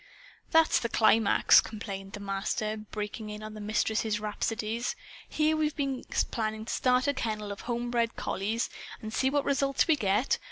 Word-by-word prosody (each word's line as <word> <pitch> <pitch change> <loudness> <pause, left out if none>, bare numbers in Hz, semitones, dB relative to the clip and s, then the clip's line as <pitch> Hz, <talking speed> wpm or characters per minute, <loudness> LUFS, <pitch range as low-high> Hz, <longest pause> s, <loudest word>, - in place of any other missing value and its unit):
"That's 325 -1 +5
the 235 - -2
climax!" 220 -1 +5
complained 195 -3 -7
the 205 - -6
Master, 200 +2 -2
breaking 215 0 -6
in 210 0 -7
on 215 0 -7
the 215 - -8
Mistress's 215 0 0
rhapsodies. 220 +2 -2 0.3
"Here 310 0 +2
we've 305 -1 0
been 275 -3 -2 0.3
planning 220 -2 -2
to - - -3
start 250 0 +2
a 285 - +3
kennel 215 -5 -3
of 200 - -7
home 240 0 -2
bred 235 -1 +1
collies! 215 +5 -1 0.3
And 220 0 -7
see 265 - +2
what 285 +1 0
results 275 -1 +2
we 320 - +5
get! 210 0 +1
220 Hz, 170 wpm, -29 LUFS, 210-255 Hz, 0.3 s, That's